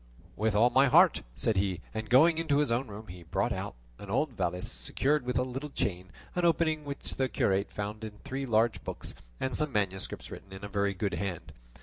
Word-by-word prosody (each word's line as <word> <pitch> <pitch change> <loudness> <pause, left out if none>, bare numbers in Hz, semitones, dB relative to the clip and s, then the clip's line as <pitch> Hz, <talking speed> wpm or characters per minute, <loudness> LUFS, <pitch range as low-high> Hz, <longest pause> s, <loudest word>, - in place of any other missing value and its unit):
"With 110 0 0
all 120 +4 +5
my 135 +1 +5
heart," 170 +6 +6
said 110 - 0
he, 95 -2 +1
and 110 -1 -4
going 160 +6 +6
into 150 -4 +2
his 145 -5 +2
own 125 +3 +1
room 105 +1 -8
he 90 -2 -10
brought 80 - -1
out - - -4 0.2
an 100 - -9
old 135 +7 +1
valise 90 -3 -1
secured 145 0 +1
with 125 - 0
a 125 - +3
little 135 +4 -5
chain, 95 -8 -3 0.2
on 180 - 0
opening 160 -2 +2
which 140 -1 -5
the 130 -1 +1
curate 100 -3 +1
found 105 +1 -5
in 110 -1 -6
it - - -19
three 135 +1 -4
large 115 0 +2
books - - -6 0.3
and 130 - -1
some 150 -2 0
manuscripts 95 -4 -2
written 95 0 -10
in 95 +1 -9
a - - -3
very 100 -1 0
good 100 0 -1
hand. 90 0 -4
110 Hz, 220 wpm, -30 LUFS, 100-140 Hz, 0.3 s, heart